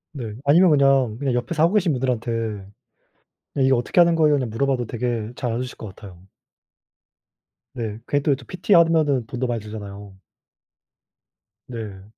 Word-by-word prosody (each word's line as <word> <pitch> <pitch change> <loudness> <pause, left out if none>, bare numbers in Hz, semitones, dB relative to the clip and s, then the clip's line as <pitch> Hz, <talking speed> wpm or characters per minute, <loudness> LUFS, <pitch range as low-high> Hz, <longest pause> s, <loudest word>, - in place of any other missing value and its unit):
네. 115 -6 -6
아니면 170 +6 +5
그냥 135 -6 +3
그냥 135 -2 -1
옆에서 150 +6 0
하고 170 +5 +3
계신 185 -6 +2
분들한테 115 -4 -2 1.0
"이거 130 0 +4
어떻게 120 +8 +1
하는 170 -1 +5
거예요?" 155 -2 +4
그냥 130 -4 -2
물어봐도 125 +1 -1
되게 120 -2 -3
잘 120 -2 -2
알려 120 +2 -2
주실 130 - -7
것 110 - -8
같아요. 90 -4 -13 1.6
네 110 -3 -4
그게 145 - +1
또 145 - +1
이 - - 0
PT하면은 165 - +2
돈도 125 +2 -3
많이 120 -2 -2
들잖아요. 100 -2 -9 1.5
네. 105 -6 -7
125 Hz, 320 characters per minute, -22 LUFS, 110-145 Hz, 1.6 s, 아니면